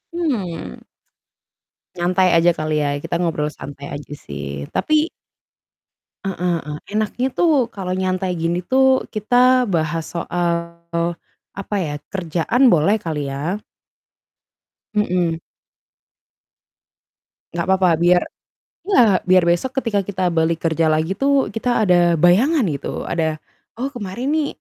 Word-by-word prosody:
Mmm. 210 Hz, -, -3 dB, 1.2 s
Nyantai 180 Hz, +1 st, +2 dB
aja 170 Hz, +1 st, +5 dB
kali 155 Hz, 0 st, -1 dB
ya, 145 Hz, -, 0 dB
kita 170 Hz, -, -4 dB
ngobrol 150 Hz, -3 st, -1 dB
santai 140 Hz, 0 st, -9 dB
aja 145 Hz, 0 st, -9 dB
sih 70 Hz, 0 st, -6 dB
tapi 310 Hz, +1 st, +2 dB, 1.2 s
Heeh 195 Hz, -1 st, -3 dB, 0.3 s
heeh, 150 Hz, 0 st, -5 dB, 0.2 s
enaknya 215 Hz, +4 st, 0 dB
tuh 300 Hz, -8 st, +3 dB
kalau 190 Hz, -5 st, -4 dB
nyantai 185 Hz, 0 st, -1 dB
gini 170 Hz, +1 st, 0 dB
tuh 265 Hz, +2 st, +3 dB
kita 215 Hz, +3 st, -1 dB, 0.3 s
bahas 165 Hz, -2 st, 0 dB
soal, 170 Hz, 0 st, -1 dB, 1.0 s
apa 200 Hz, +1 st, -5 dB
ya? 145 Hz, -, -4 dB, 0.2 s
Kerjaan 175 Hz, -, -1 dB
boleh 170 Hz, +6 st, +3 dB
kali 150 Hz, -7 st, -4 dB
ya? 150 Hz, +9 st, -3 dB, 1.3 s
Mhm. 180 Hz, -5 st, +1 dB, 2.2 s
Nggak 170 Hz, -1 st, -2 dB
apa-apa, 190 Hz, -1 st, +3 dB
biar 175 Hz, 0 st, +5 dB, 0.6 s
iya, 235 Hz, -, +5 dB
biar 185 Hz, -1 st, +5 dB
besok 175 Hz, +9 st, +1 dB
ketika 215 Hz, -4 st, 0 dB
kita 185 Hz, -3 st, -1 dB
balik 165 Hz, 0 st, +1 dB
kerja 165 Hz, -1 st, +2 dB
lagi 155 Hz, +2 st, +1 dB
tuh, 275 Hz, -5 st, +2 dB
kita 225 Hz, +1 st, 0 dB
ada 180 Hz, -3 st, +4 dB, 0.2 s
bayangan 220 Hz, -, +4 dB
gitu, 140 Hz, -, -4 dB
ada, 160 Hz, -2 st, -1 dB, 0.4 s
"Oh 260 Hz, +4 st, -3 dB
kemarin 235 Hz, 0 st, -5 dB
nih 310 Hz, -1 st, +1 dB
180 Hz, 120 wpm, -20 LUFS, 165-215 Hz, 2.2 s, aja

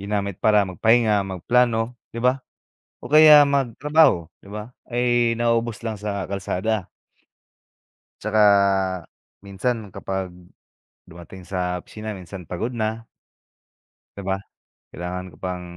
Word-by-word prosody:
ginamit 100 Hz, -1 st, -2 dB
para 105 Hz, -1 st, +5 dB
magpahinga, 110 Hz, +1 st, +3 dB
magplano, 115 Hz, +5 st, +1 dB, 0.2 s
di 115 Hz, -, -4 dB
ba, 125 Hz, +2 st, +3 dB, 0.7 s
o -, -, -8 dB
kaya 155 Hz, -1 st, +9 dB
magtrabaho, 140 Hz, -, +2 dB, 0.2 s
di -, -, -14 dB
ba, 105 Hz, +3 st, -7 dB, 0.2 s
ay 120 Hz, -1 st, +2 dB
nauubos 115 Hz, -1 st, 0 dB
lang 110 Hz, -2 st, -3 dB
sa 100 Hz, -2 st, -3 dB
kalsada. 100 Hz, +1 st, -2 dB, 1.3 s
Tsaka 110 Hz, +1 st, +1 dB, 1.1 s
minsan 105 Hz, +1 st, -3 dB
kapag 95 Hz, -2 st, -4 dB, 0.7 s
dumating 85 Hz, +2 st, -12 dB
sa 90 Hz, -1 st, -2 dB
opisina 110 Hz, +4 st, -8 dB
minsan 90 Hz, +1 st, -9 dB
pagod 115 Hz, +8 st, -3 dB
na 110 Hz, 0 st, -3 dB, 1.1 s
di 100 Hz, -, -7 dB
ba? 95 Hz, -, +1 dB, 0.6 s
Kailangan 90 Hz, +2 st, -6 dB
ko -, -, -17 dB
pang 90 Hz, 0 st, -5 dB
105 Hz, 115 wpm, -23 LUFS, 95-120 Hz, 1.3 s, kaya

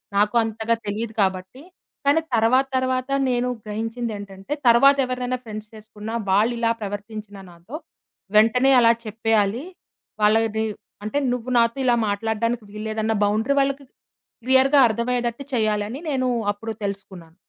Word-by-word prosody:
నాకు 210 Hz, +3 st, +2 dB
అంతగా 225 Hz, +1 st, -1 dB
తెలీదు 215 Hz, +2 st, -3 dB
కాబట్టి, 190 Hz, +6 st, -2 dB, 0.4 s
కానీ 290 Hz, +3 st, +4 dB
తర్వాత 240 Hz, +4 st, +3 dB
తర్వాత 255 Hz, 0 st, -1 dB, 0.2 s
నేను 250 Hz, 0 st, 0 dB, 0.2 s
గ్రహించిందేంటంటే, 215 Hz, -1 st, -5 dB
తర్వాత 275 Hz, +4 st, +7 dB
ఎవరైనా 250 Hz, 0 st, -2 dB
ఫ్రెండ్స్ 215 Hz, -1 st, -8 dB
చేసుకున్నా 215 Hz, +1 st, -8 dB, 0.2 s
వాళ్ళు 215 Hz, +5 st, +3 dB
ఇలా 230 Hz, -1 st, +2 dB
ప్రవర్తించినా 205 Hz, 0 st, -7 dB
నాతో, 175 Hz, -, -11 dB, 0.6 s
వెంటనే 250 Hz, +5 st, +4 dB
అలా 230 Hz, 0 st, +6 dB
చెప్పేయాలి. 220 Hz, +1 st, 0 dB, 0.6 s
వాళ్ళ 215 Hz, +1 st, +5 dB, 0.2 s
ది 220 Hz, -, +1 dB, 0.4 s
అంటే 215 Hz, +7 st, -2 dB, 0.2 s
నువ్వు 250 Hz, 0 st, -4 dB
నాతో 230 Hz, +2 st, +2 dB
ఇలా 245 Hz, -, +4 dB
మాట్లాడడానికి 225 Hz, +3 st, -1 dB
వీలులేదన్న 220 Hz, +1 st, -2 dB
బౌండరీ 220 Hz, +7 st, +1 dB
వాళ్ళకి 275 Hz, +1 st, -1 dB
క్ -, -, -41 dB, 0.5 s
క్లియర్‌గా 265 Hz, +2 st, +4 dB
అర్థమయ్యేదట్టు 235 Hz, +3 st, -2 dB
చేయాలని 215 Hz, +2 st, 0 dB
నేను 255 Hz, -1 st, 0 dB, 0.2 s
అప్పుడు 225 Hz, +2 st, -6 dB
తెలుసుకున్నాను. 190 Hz, -4 st, -7 dB
225 Hz, 125 wpm, -23 LUFS, 210-250 Hz, 0.6 s, తర్వాత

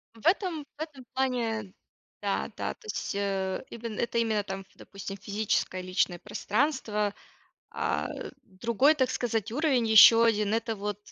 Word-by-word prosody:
В 225 Hz, -, -16 dB
этом 355 Hz, -4 st, +1 dB
в -, -, -9 dB
этом 280 Hz, -5 st, -7 dB
плане 230 Hz, -6 st, -1 dB, 0.5 s
да-да. -, -, -2 dB
То -, -, -22 dB
есть, 430 Hz, -, -3 dB
э, 195 Hz, -1 st, -1 dB
име 230 Hz, 0 st, -6 dB
это 235 Hz, +1 st, -1 dB
именно 220 Hz, -3 st, +1 dB
там, 195 Hz, -1 st, -6 dB
допустим, 195 Hz, 0 st, -8 dB
физическое 200 Hz, -3 st, -1 dB
и -, -, -10 dB
личное 185 Hz, -1 st, 0 dB
пространство. 210 Hz, -, -1 dB, 0.6 s
А, -, -, -1 dB, 0.4 s
другой, 235 Hz, +9 st, +2 dB
так 260 Hz, -4 st, +1 dB
сказать, 225 Hz, -2 st, -1 dB
уровень, 265 Hz, -5 st, +2 dB
ещё 220 Hz, +1 st, +9 dB
1- 215 Hz, -2 st, +2 dB
это 225 Hz, -1 st, -1 dB
вот, 205 Hz, 0 st, -4 dB
225 Hz, 145 wpm, -28 LUFS, 200-250 Hz, 0.6 s, ещё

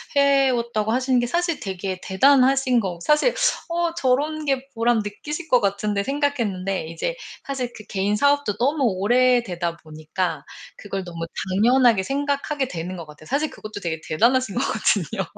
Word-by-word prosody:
해왔다고 255 Hz, -6 st, +2 dB
하시는 255 Hz, 0 st, +2 dB
게 240 Hz, -, 0 dB
사실 340 Hz, +3 st, -1 dB
되게 190 Hz, -1 st, -4 dB
대단하신 265 Hz, +4 st, +4 dB
거 180 Hz, -4 st, -4 dB
사실 300 Hz, -, +3 dB, 0.4 s
'어 340 Hz, 0 st, 0 dB
저런 300 Hz, +1 st, 0 dB
게 270 Hz, -1 st, -1 dB
보람 230 Hz, 0 st, +2 dB
느끼실 295 Hz, +11 st, -5 dB
것 250 Hz, -3 st, +4 dB
같은데.' 200 Hz, 0 st, 0 dB
생각했는데 215 Hz, -, -1 dB
이제 165 Hz, -, -3 dB, 0.3 s
사실 255 Hz, -3 st, -4 dB
그 215 Hz, -, -10 dB
개인사업도 210 Hz, +4 st, +1 dB
너무 280 Hz, +5 st, +1 dB
오래되다 205 Hz, -4 st, +1 dB
보니까 155 Hz, +3 st, -4 dB, 0.3 s
그걸 195 Hz, -2 st, -5 dB
너무 170 Hz, -1 st, -5 dB, 0.2 s
당연하게 230 Hz, +1 st, +4 dB
생각하게 280 Hz, +2 st, -1 dB
되는 175 Hz, +2 st, -5 dB
것 170 Hz, -, -7 dB
같아요. 150 Hz, +1 st, -14 dB
사실 295 Hz, +3 st, 0 dB
그것도 215 Hz, -1 st, -9 dB
되게 165 Hz, -3 st, -3 dB
대단하신 235 Hz, +5 st, +2 dB
거거든요. 205 Hz, -2 st, 0 dB
235 Hz, 345 characters per minute, -23 LUFS, 190-275 Hz, 0.4 s, 대단하신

